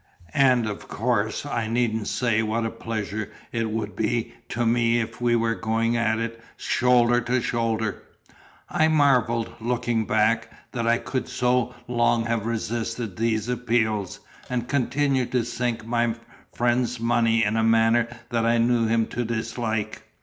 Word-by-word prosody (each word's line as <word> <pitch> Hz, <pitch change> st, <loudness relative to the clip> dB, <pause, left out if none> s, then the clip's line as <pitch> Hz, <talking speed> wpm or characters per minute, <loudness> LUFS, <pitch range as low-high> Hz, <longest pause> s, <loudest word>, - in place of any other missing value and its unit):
And 130 Hz, -4 st, +5 dB
of 105 Hz, -1 st, -5 dB
course 110 Hz, +1 st, -1 dB
I 115 Hz, -6 st, -2 dB
needn't 115 Hz, -2 st, 0 dB
say 115 Hz, -3 st, +1 dB
what 115 Hz, +1 st, -1 dB
a 115 Hz, -, -2 dB
pleasure 110 Hz, -2 st, -4 dB, 0.2 s
it 115 Hz, -1 st, -1 dB
would 110 Hz, -1 st, -3 dB
be 115 Hz, +1 st, -1 dB, 0.2 s
to 120 Hz, +1 st, -1 dB
me 115 Hz, 0 st, +3 dB
if 115 Hz, +1 st, -5 dB
we 120 Hz, -1 st, +3 dB
were 115 Hz, -1 st, +1 dB
going 115 Hz, +1 st, 0 dB
at 110 Hz, -1 st, +1 dB
it 115 Hz, 0 st, -4 dB, 0.2 s
SHOULDER 120 Hz, -1 st, +3 dB
TO 125 Hz, +2 st, 0 dB
SHOULDER." 115 Hz, -3 st, -1 dB, 0.7 s
I 155 Hz, -, +2 dB
marvel 125 Hz, -7 st, +3 dB
(looking 115 Hz, -1 st, -1 dB
back) 115 Hz, 0 st, +1 dB, 0.2 s
that 115 Hz, -2 st, -2 dB
I 115 Hz, 0 st, +4 dB
could 130 Hz, 0 st, -4 dB
so 125 Hz, 0 st, +1 dB
long 120 Hz, -1 st, +2 dB
have 115 Hz, -1 st, -1 dB
resisted 115 Hz, -2 st, -3 dB
these 110 Hz, 0 st, 0 dB
appeals, 110 Hz, -5 st, 0 dB, 0.3 s
and 120 Hz, -1 st, -2 dB
continue 140 Hz, -1 st, +1 dB
to 125 Hz, -3 st, 0 dB
sink 120 Hz, -1 st, -2 dB
my 120 Hz, -1 st, 0 dB, 0.4 s
friend's 120 Hz, 0 st, 0 dB
money 115 Hz, -1 st, +2 dB
in 105 Hz, +1 st, +1 dB
a 115 Hz, -, +2 dB
manner 115 Hz, +1 st, +4 dB, 0.2 s
that 115 Hz, -1 st, +1 dB
I 115 Hz, +1 st, +3 dB
knew 115 Hz, 0 st, +2 dB
him 115 Hz, 0 st, +2 dB
to 120 Hz, -, -2 dB
dislike. 110 Hz, -1 st, -3 dB
115 Hz, 155 wpm, -24 LUFS, 110-120 Hz, 0.7 s, And